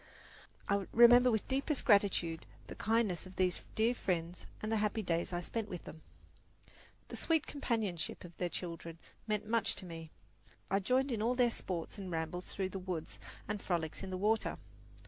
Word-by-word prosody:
I 200 Hz, -2 st, +1 dB
remember 240 Hz, +2 st, +8 dB
with 220 Hz, -3 st, 0 dB
deepest 275 Hz, +2 st, 0 dB
gratitude 195 Hz, -6 st, +3 dB, 0.2 s
the -, -, -8 dB
kindness 215 Hz, -5 st, +1 dB
of 185 Hz, -, -13 dB
these 180 Hz, -2 st, +1 dB
dear 225 Hz, +2 st, +3 dB
friends 175 Hz, -5 st, -2 dB
and 215 Hz, -, -3 dB
the 225 Hz, -, +3 dB
happy 210 Hz, +1 st, 0 dB
days 170 Hz, -1 st, 0 dB
I 175 Hz, 0 st, -1 dB
spent 220 Hz, +3 st, -3 dB
with 180 Hz, -3 st, -6 dB
them. 160 Hz, -, -10 dB, 1.1 s
The -, -, -6 dB
sweet 320 Hz, -2 st, +1 dB
companionship 220 Hz, -, -2 dB
of 175 Hz, -1 st, -11 dB
their 180 Hz, -, -1 dB
children 170 Hz, -1 st, -5 dB, 0.3 s
meant 210 Hz, -1 st, 0 dB
much 230 Hz, +1 st, +2 dB
to 190 Hz, -, -6 dB
me. 165 Hz, -2 st, -7 dB, 0.6 s
I 195 Hz, -, +4 dB
joined 255 Hz, +6 st, +2 dB
in 225 Hz, -3 st, -1 dB
all 240 Hz, +3 st, +2 dB
their 245 Hz, -2 st, +4 dB
sports 180 Hz, -2 st, -4 dB
and 190 Hz, -2 st, -5 dB
rambles 165 Hz, +2 st, -3 dB
through 190 Hz, -1 st, -2 dB
the 195 Hz, -, -5 dB
woods 180 Hz, -4 st, -4 dB, 0.3 s
and 210 Hz, 0 st, -2 dB
frolics 165 Hz, -3 st, -1 dB
in 195 Hz, -, -5 dB
the 185 Hz, -, -3 dB
water. 215 Hz, +4 st, +1 dB
195 Hz, 180 wpm, -34 LUFS, 175-225 Hz, 1.1 s, remember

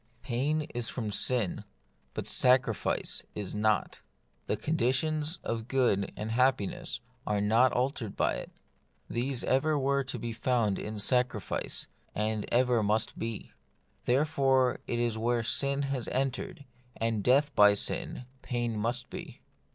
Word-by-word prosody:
Pain 140 Hz, +6 st, 0 dB
is 120 Hz, -2 st, -2 dB
from 110 Hz, -4 st, -3 dB
sin, 115 Hz, -2 st, +1 dB, 0.5 s
but -, -, -4 dB
sacrifice 125 Hz, -4 st, +2 dB
is 100 Hz, -3 st, -3 dB
not. 105 Hz, -1 st, 0 dB, 0.5 s
The -, -, 0 dB
conditions 155 Hz, +2 st, 0 dB
of 115 Hz, 0 st, -3 dB
good 120 Hz, -7 st, +1 dB
and 110 Hz, +1 st, -4 dB
of -, -, -1 dB
happiness 135 Hz, +4 st, +1 dB, 0.3 s
are 105 Hz, -1 st, +1 dB
not 115 Hz, +5 st, +4 dB
altered 125 Hz, -4 st, -1 dB
by -, -, +2 dB
it. -, -, -7 dB, 0.6 s
These 125 Hz, +1 st, 0 dB
ever 150 Hz, +4 st, +2 dB
were 140 Hz, 0 st, +1 dB
to 130 Hz, -1 st, -4 dB
be 115 Hz, 0 st, -4 dB
found 115 Hz, -4 st, +1 dB
in 105 Hz, 0 st, -5 dB
sacrifice, 125 Hz, -2 st, 0 dB, 0.3 s
and 105 Hz, 0 st, -1 dB
ever 125 Hz, -1 st, +3 dB
must 105 Hz, +1 st, +1 dB
be. 115 Hz, -2 st, -4 dB, 0.5 s
Therefore 135 Hz, -2 st, +2 dB
it 120 Hz, -, -1 dB
is 120 Hz, -1 st, +1 dB
that 110 Hz, -, -5 dB
where 120 Hz, +1 st, +1 dB
sin 140 Hz, +4 st, +1 dB
has 135 Hz, -3 st, -2 dB
entered, 135 Hz, +2 st, -2 dB, 0.3 s
and 115 Hz, -2 st, -1 dB
death 140 Hz, +5 st, +4 dB
by 105 Hz, -3 st, +7 dB
sin, 125 Hz, -, -3 dB, 0.2 s
pain 120 Hz, -2 st, -2 dB
must 120 Hz, +4 st, -2 dB
be. -, -, -8 dB
120 Hz, 145 wpm, -30 LUFS, 110-135 Hz, 0.6 s, by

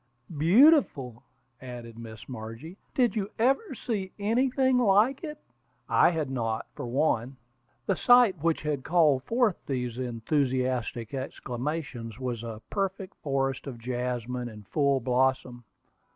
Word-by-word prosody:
"Beautiful!" 165 Hz, -, +4 dB, 0.4 s
added 120 Hz, -3 st, -9 dB
Miss 110 Hz, -2 st, -10 dB
Margie. 115 Hz, +7 st, -8 dB, 0.2 s
"Did 245 Hz, -3 st, +2 dB
you 205 Hz, -2 st, -1 dB
ever 270 Hz, -, +1 dB
see 205 Hz, -6 st, -3 dB
anything 255 Hz, +4 st, +2 dB
like 230 Hz, -, +3 dB
it?" 300 Hz, -2 st, -5 dB, 0.5 s
I -, -, +5 dB
had 155 Hz, -5 st, -2 dB
not, 115 Hz, -3 st, -2 dB
for -, -, -6 dB
one. 130 Hz, -1 st, 0 dB, 0.5 s
The -, -, +1 dB
sight 245 Hz, -, +5 dB
which 165 Hz, -1 st, 0 dB
had 150 Hz, -3 st, -2 dB
called 155 Hz, -6 st, +3 dB
forth 230 Hz, -5 st, +1 dB
these 125 Hz, -3 st, -3 dB
enthusiastic 125 Hz, -1 st, -1 dB
exclamations 130 Hz, -2 st, -5 dB
was 125 Hz, -3 st, -3 dB
a 115 Hz, -2 st, -7 dB
perfect 195 Hz, -1 st, -2 dB
forest 135 Hz, -2 st, -1 dB
of 130 Hz, -3 st, -6 dB
jasmine 125 Hz, 0 st, -3 dB
in 105 Hz, -2 st, -11 dB
full 140 Hz, +4 st, +1 dB
blossom. 125 Hz, -1 st, 0 dB
135 Hz, 125 wpm, -28 LUFS, 120-195 Hz, 0.5 s, I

